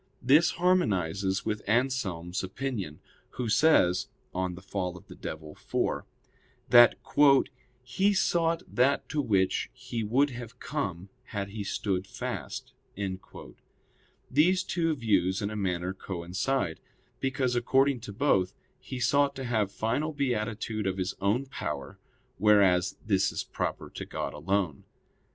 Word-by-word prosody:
This 150 +6 +5
harmonizes 100 - +1
with 105 0 -1
Anselm's 105 -9 0
opinion, 95 - -4 0.4
who 125 - -1
says 110 - +4 0.3
[*De 90 - -3
casu 90 0 -3
diaboli, 75 -1 -3
iv.] - - -18 0.6
that 120 -1 +8 0.9
"he 190 +11 +2
sought 170 -3 +1
that 130 +3 +2
to 150 -2 0
which 95 -7 +1
he 115 -2 -5
would 135 +7 +2
have 120 0 -8
come 100 - -4 0.2
had 100 -4 -4
he 105 +1 -5
stood 95 -1 -2
fast." - - -5 1.6
These 180 +7 +4
two 165 -3 0
views 95 -7 +1
in 100 -1 -2
a - - -5
manner 90 -2 -1
coincide; 95 +3 -2 0.4
because 130 -2 0
according 135 +2 +3
to 115 -2 -8
both, 95 -5 +1 0.2
he 130 0 -7
sought 140 +3 +3
to 135 - -5
have 110 -5 0
final 145 +10 -1
beatitude 110 -5 -1
of 95 0 -1
his 95 0 -1
own 105 +7 +1
power, 75 - -5 0.4
whereas 95 -3 +4
this 95 -3 +2
is - - -3
proper - - -3
to - - -6
God - - -4
alone. 90 -2 -1
110 Hz, 125 wpm, -29 LUFS, 95-135 Hz, 1.6 s, that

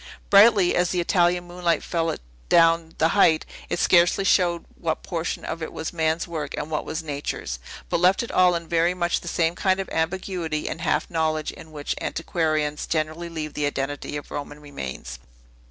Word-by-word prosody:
Brightly 200 -3 +6
as 180 0 +2
the 180 - 0
Italian 175 0 +2
moonlight 175 -1 -1
fell 165 -1 -1
adown 160 - +1
the 160 - +3
height, 165 -5 +4 0.2
it 175 - -1
scarcely 175 +2 +4
showed 175 -3 +2
what 160 -2 -3
portion 170 -1 -3
of 165 - -4
it 160 - -4
was 160 - -5
man's 160 0 0
work 155 -4 -4
and 150 +1 -4
what 155 - -2
was 160 +1 -4
nature's, 140 - -4 0.3
but - - 0
left 185 +5 +4
it 235 - -6
all 180 -1 +4
in 170 -1 -4
very 170 +2 +2
much 175 -1 0
the - - -10
same 165 -1 +1
kind 190 +1 +1
of 195 - -3
ambiguity 165 -2 -2
and 165 - -4
half - - 0
knowledge 155 -2 0
in 160 - -13
which 145 -2 -3
antiquarians 155 -3 -1
generally 160 +2 -2
leave 155 -2 -5
the 150 -1 0
identity 145 +1 -3
of 145 - -9
Roman 145 +1 -6
remains. 65 - -7
165 Hz, 185 wpm, -24 LUFS, 155-175 Hz, 0.3 s, Brightly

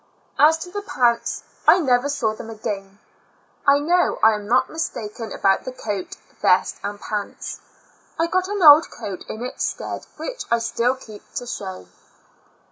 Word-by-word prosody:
As 315 +2 +6
to 355 +2 -8
the 410 +1 -4
pants, 240 -11 0 0.2
I - - +8
never 260 -3 +2
saw 235 -7 0
them 225 +1 -9
ascain. 200 -3 -5 0.7
I 280 0 +7
know 345 +5 +2
I 220 0 +7
am 210 -1 -5
not 250 +3 +3
mistaken 225 -8 -5
about 195 0 +2
the 255 - -5
coat, 205 -6 -5 0.2
vest 180 - +3
and 205 0 -4
pants; 205 -1 -5 0.6
I 330 - +2
got 370 +2 0
an 405 -2 -2
old 300 +1 +9
coat 195 -3 -7
in 220 - -5
its 255 - -4
stead - - -4
which - - -5
I 235 - +4
still 235 +2 0
keep 220 -5 -12
to 245 - -3
show. 95 - -6
240 Hz, 165 wpm, -22 LUFS, 210-305 Hz, 0.7 s, old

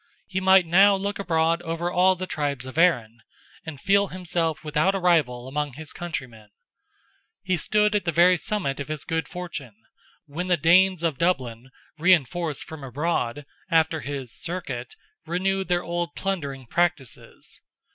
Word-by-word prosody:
He 190 - -3
might 190 -1 +6
now 195 +4 +6
look 200 +1 -3
abroad 165 -2 +1
over 165 +1 -3
all 185 +1 +4
the 185 +1 -4
tribes 145 -7 -3
of 130 - -9
Erin, 120 -10 +2 0.5
and 150 -4 -7
feel 200 +4 +3
himself 170 -4 -2
without 155 +5 +1
a - - -1
rival 145 -9 +1
among 145 0 -3
his 150 +3 -8
countrymen. 125 -11 -7 0.9
He 185 -1 +1
stood 210 +5 +1
at 205 -3 0
the 170 - +1
very 175 +2 +5
summit 170 -11 -2
of 140 - -5
his 155 -1 -5
good 165 0 -2
fortune, 170 - -7 0.5
when 165 +5 -5
the 180 -1 +3
Danes 180 +3 +4
of 160 -6 -1
Dublin, 130 -8 -1 0.3
reinforced 170 -2 +2
from 160 -3 -10
abroad, 140 -1 -2 0.2
after 160 -2 +2
his 135 -3 -6
"Circuit," 140 -9 -5 0.3
renewed 190 +3 -1
their 175 -1 +1
old 175 0 -3
plundering 140 -9 -3
practices. 170 -2 -3
165 Hz, 155 wpm, -24 LUFS, 140-180 Hz, 0.9 s, might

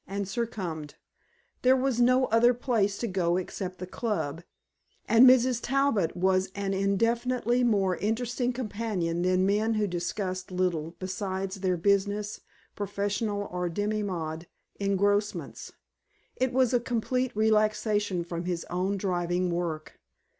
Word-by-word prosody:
and 200 0 -3
succumbed. 190 -9 -4 0.7
There 255 +1 +5
was 260 -2 +1
no 255 +2 +4
other 240 +2 +5
place 220 -5 0
to 235 - -2
go 180 -3 +1
except 185 0 -5
the 185 - -5
Club, 180 -7 -3 0.7
and 240 +3 +8
Mrs. 255 -1 +4
Talbot 270 - +1
was 190 +1 +2
an 200 -1 -2
infinitely 235 +5 +1
more 200 -6 +2
interesting 245 +3 -1
companion 205 -8 -2
than 185 +1 +2
men 215 +3 +1
who 215 -1 +1
discussed 185 +1 -3
little 180 -3 -1
besides 190 +1 -4
their 185 -2 0
business, 200 +3 0 0.3
professional, 205 +1 -2
or 180 0 -2
demi 210 +5 -1
monde 165 -4 -4 0.3
engrossments. 200 +1 0 0.6
It 260 0 0
was 255 -1 +2
a 245 - +4
complete 250 +2 -1
relaxation 215 -3 +1
from 170 0 -5
his 175 -2 -2
own 185 +3 0
driving 180 -1 -1
work. 170 -3 -4
200 Hz, 130 wpm, -28 LUFS, 185-230 Hz, 0.7 s, and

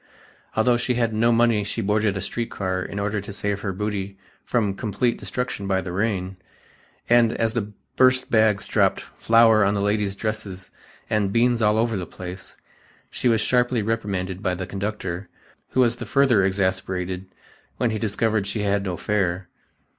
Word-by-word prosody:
Although 120 +2 +3
she 125 +1 0
had 115 -2 0
no 115 +2 +3
money 115 -2 +3
she 100 - -4
boarded 105 -1 +1
a - - -3
street 115 +5 -3
car 95 -1 -2
in 100 - -6
order 100 0 -1
to 100 - -8
save 100 0 -2
her 100 - -2
booty 100 0 -4 0.3
from 105 -5 0
complete 110 +4 -1
destruction 125 -6 -3
by 95 -1 +1
the 95 -1 -5
rain, 95 -1 -1 0.7
and 120 -1 +4
as 115 -1 0
the 105 -3 -2 0.3
burst 130 0 +4
bags 110 -3 +3
dropped - - +2 0.2
"flour 115 -2 +5
on 100 +1 +2
the - - 0
ladies' 100 -1 0
dresses" 100 -3 -5 0.4
and 105 -3 0
""beans 120 +1 +2
all 105 0 +3
over 115 -1 +1
the 90 - -4
place," 90 +1 -9 0.5
she - - -1
was 115 -2 +3
sharply 125 -1 +2
reprimanded 100 -4 -2
by 95 -3 0
the 95 +1 -4
conductor, 100 -2 -4 0.4
who 130 - +2
was 120 -1 +2
the 120 - -7
further 125 -5 +4
exasperated 95 -1 -1 0.5
when 120 -2 +1
he 110 - -2
discovered 110 -1 0
she 105 +1 -2
had 100 0 +1
no 90 -3 -3
fare. 95 -2 -1
105 Hz, 175 wpm, -23 LUFS, 95-115 Hz, 0.7 s, flour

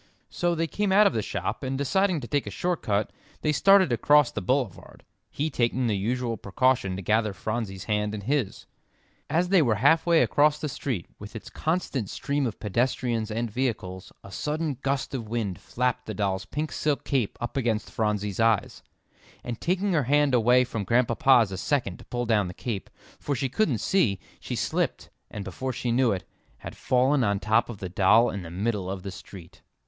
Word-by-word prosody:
So 175 -1 0
they 165 0 0
came 200 +5 -1
out 205 +2 +6
of - - +3
the 110 - 0
shop, 100 -2 -3
and 135 -1 -2
deciding 180 +4 +1
to 120 - -7
take 145 +2 -1
a - - -2
short 180 -1 -2
cut, 105 0 0 0.3
they 150 - +2
started 190 0 +5
across 145 +4 +4
the - - -4
boulevard, 120 -2 -2 0.3
he 155 +2 -2
taking 125 0 0
the 110 -3 +1
usual 115 +3 -1
precaution 120 0 +1
to 95 - -6
gather 110 +1 +1
Phronsie's 105 -2 -4
hand 105 0 -1
in 105 - -5
his. 130 -1 -2 0.6
As 170 +4 +1
they 190 -3 +5
were 120 -7 +2
halfway 160 - +4
across 150 +1 +3
the 150 0 -4
street, 125 -9 -3
with 105 +2 -10
its 110 - -8
constant 155 - -2
stream 140 -1 -1
of 110 - -6
pedestrians 115 +1 -1
and 115 +1 -2
vehicles, 100 -7 -3
a 100 - -11
sudden 150 +3 -2
gust 135 -1 -1
of 115 -5 -4
wind 110 -6 -2
flapped 125 0 -2
the 110 - -4
doll's 95 -2 -1
pink 150 +9 -4
silk 150 -2 -1
cape 130 -7 -1
up 120 - -5
against 115 -5 -1
Phronsie's 105 -3 -1
eyes, 115 -2 +1 0.6
and 120 -2 -6
taking 190 +2 0
her 150 -6 +2
hand 145 +1 +3
away 125 +1 +5
from 115 -4 -4
Grandpapa's 120 0 +3
a 95 - -4
second 120 -10 -1
to - - -13
pull 120 0 -3
down 105 -4 +2
the 90 - -8
cape, 110 -6 -4 0.3
for 145 - -2
she 135 0 -1
couldn't 140 - +1
see, 105 - +1 0.2
she - - -5
slipped, - - -2 0.2
and 105 - -6
before 130 +8 -4
she 120 0 -2
knew 125 0 +3
it, 95 -2 -2 0.3
had - - -9
fallen 130 +2 +2
on 100 -3 +1
top 110 +3 +2
of 115 - -6
the 95 - -5
doll 105 +6 +4
in 100 - -5
the 85 - -8
middle 100 +1 -2
of 95 -1 -5
the 100 - -5
street. 90 -2 -12
120 Hz, 195 wpm, -26 LUFS, 105-140 Hz, 0.6 s, out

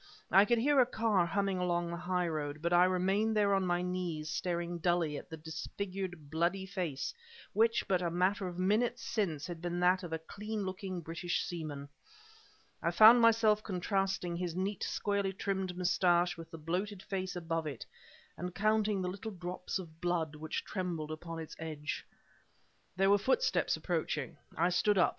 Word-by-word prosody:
I 195 +3 +7
could 240 +2 +3
hear 280 +4 +4
a 255 - +7
car 215 -7 +2
humming 195 +1 0
along 175 -1 0
the - - -3
highroad, 170 -5 -2
but 170 +2 0
I 175 +1 +7
remained 195 +4 +1
there 200 -1 +4
on 195 -1 +2
my 175 0 +1
knees 175 -4 -3
staring 170 +1 -2
dully 170 -3 +1
at 145 - -7
the 160 - -7
disfigured 175 +1 -5
bloody 175 +4 0
face 180 -8 -3 0.4
which 225 +2 +3
but 185 -2 +2
a 175 - 0
matter 185 +3 +1
of 175 -1 -6
minutes 225 +6 +1
since 165 -12 -1
had 175 -2 -6
been 175 0 -2
that 180 +1 +4
of 175 - -7
a 160 - 0
clean 210 +5 -5
looking 185 -1 -4
British 170 +2 -2
seaman. 155 -5 -5 0.9
I - - +1
found 225 +3 +8
myself 225 -2 +5
contrasting 190 -2 -1
his 175 -1 -3
neat, 190 +1 -2
squarely 200 -2 -1
trimmed 190 -2 -2
mustache 175 -1 +3
with 165 -1 -10
the 165 - -8
bloated 185 +5 -3
face 190 -2 -3
above 165 -2 -2
it, 140 -5 -6 0.5
and 180 +1 -5
counting 210 -1 +2
the - - -1
little 200 +4 -5
drops 180 -1 -4
of 165 -4 -10
blood 170 -3 0
which 155 +1 -4
trembled 170 -5 -3
upon 165 +1 -6
its 160 -1 -7
edge. 155 -2 -4 0.9
There 195 +1 +4
were 205 - +5
footsteps 265 - +2
approaching. - - -2 0.2
I 170 +2 +3
stood 200 +3 +2
up. 180 - +5
180 Hz, 175 wpm, -33 LUFS, 170-195 Hz, 0.9 s, found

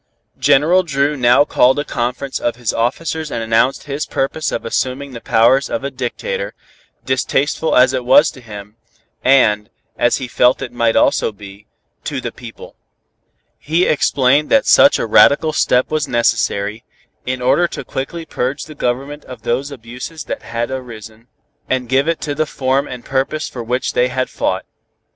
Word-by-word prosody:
General 145 +7 +4
Dru 145 -3 0
now 125 +2 +4
called 130 -2 +3
a 145 - -2
conference 125 +3 -3
of 120 - -1
his 120 -2 -2
officers 155 +6 -2
and 115 -4 -3
announced 115 +4 +1
his 145 +1 -4
purpose 145 +4 -2
of - - -4
assuming 130 +4 -2
the 120 -2 -9
powers 125 +3 +3
of 115 - -3
a 140 - -3
dictator, 475 - -4 0.5
distasteful 135 +4 0
as 130 +1 +5
it 130 -1 -2
was 125 +2 +5
to 130 - -14
him, 105 -1 -11 0.5
and, 110 -6 +3 0.3
as 120 0 +3
he 130 - -5
felt 125 +1 +3
it - - -6
might 115 -2 +1
also - - +2
be, 100 0 -13 0.4
to - - -3
the - - -5
people. - - -12 0.8
He 165 +4 +1
explained 140 0 +2
that 275 -1 +4
such 280 - +6
a - - -2
radical 150 +7 +4
step 125 +3 +1
was 155 -1 0
necessary, 110 -3 0 0.4
in 130 0 -2
order 135 +8 +2
to - - -7
quickly 160 +5 -5
purge 135 -1 -3
the 155 - -11
Government 140 +2 -3
of 125 - -11
those 130 +4 -1
abuses 125 +4 -8
that - - -5
had 115 +2 -4
arisen, 115 -3 -8 0.4
and 130 -1 -1
give 135 +4 +1
to 165 -2 -2
it - - -2
the 155 0 0
form 135 0 0
and 125 -1 -8
purpose 135 +3 -1
for 125 - -7
which 125 +3 -2
they 125 - +2
had 130 0 -3
fought. - - -2
130 Hz, 170 wpm, -17 LUFS, 120-145 Hz, 0.8 s, such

